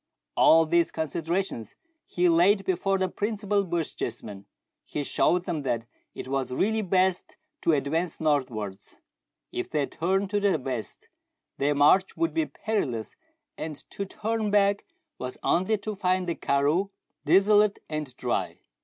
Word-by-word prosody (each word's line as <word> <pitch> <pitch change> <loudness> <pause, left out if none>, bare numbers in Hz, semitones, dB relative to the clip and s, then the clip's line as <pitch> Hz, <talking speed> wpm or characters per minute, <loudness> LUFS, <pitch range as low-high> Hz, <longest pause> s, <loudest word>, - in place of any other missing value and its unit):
All 165 0 +6
these 170 +2 +2
considerations 160 - -3 0.3
he 180 0 +1
laid 190 +4 +4
before 195 +1 +1
the 190 0 +1
principal 205 +1 -1
Bochjes 165 - -3
men. 100 -1 -9 0.4
He 145 - -4
showed 175 +5 +1
them 155 -3 -2
that 115 -4 -2 0.3
it - - -7
was 135 -1 -1
really 220 +11 +1
best 185 -1 0 0.2
to 165 - +3
advance 155 +4 -1
northwards. 125 -11 -2 0.5
If - - -4
they 150 -2 0
turned 190 +6 -1
to 205 - +2
the 200 -4 +2
west, 130 -5 -5 0.5
their 145 +1 +2
march 185 +7 +4
would 335 0 0
be 320 -2 0
perilous, 130 - -3 0.4
and 155 -1 -4 0.2
to 200 - -4
turn 220 +2 -2
back 200 0 +2 0.3
was 125 0 -5
only 190 +5 +2
to 215 +1 -5
find 185 -2 0
the 170 - 0
karroo 150 +7 +1 0.3
desolate 200 +6 +4
and 150 -5 -5
dry. 125 - -2
175 Hz, 145 wpm, -27 LUFS, 145-200 Hz, 0.5 s, All